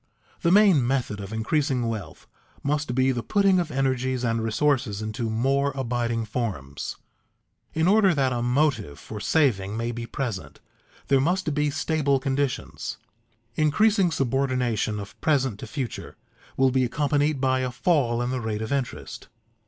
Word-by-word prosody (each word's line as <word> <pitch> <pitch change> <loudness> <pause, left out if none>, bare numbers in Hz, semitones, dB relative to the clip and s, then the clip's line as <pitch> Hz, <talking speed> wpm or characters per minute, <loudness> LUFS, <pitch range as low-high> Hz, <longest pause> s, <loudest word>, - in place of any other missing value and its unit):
_ - - -33
The 170 - +2
main 185 - +5
method 125 -6 -1
of 100 0 -7
increasing 125 +2 0
wealth 110 -4 -6 0.4
must 145 -3 -1
be 130 +1 +3
the 120 -2 -2
putting 195 - +3
of 170 -2 -1
energies 130 -2 0
and 115 -1 0
resources 120 -1 +1
into 110 +1 -3
more 135 +5 +1
abiding 120 -3 -1
forms. 100 - -4 0.8
In 160 +2 +2
order 195 -3 +5
that 135 -3 +1
a 120 - -1
motive 125 - +1
for 105 +7 -8
saving 110 -9 +1
may 115 +1 -1
be 120 0 -6
present, 115 -7 -5 0.5
there 135 -1 +4
must 175 +1 0
be 150 0 +1
stable 145 -1 +1
conditions. 135 0 -2 0.6
Increasing 190 - +3
subordination 130 -6 0
of 100 -1 -10
present 135 -8 +1
to - - -7
future 135 -6 -5 0.4
will 130 0 +4
be 130 0 +2
accompanied 145 +3 +1
by 130 0 +2
a 130 0 -1
fall 125 -3 +1
in 120 - -2
the 130 -1 -2
rate 110 -1 -3
of 110 - -5
interest. 135 -3 -4
130 Hz, 155 wpm, -25 LUFS, 115-145 Hz, 0.8 s, main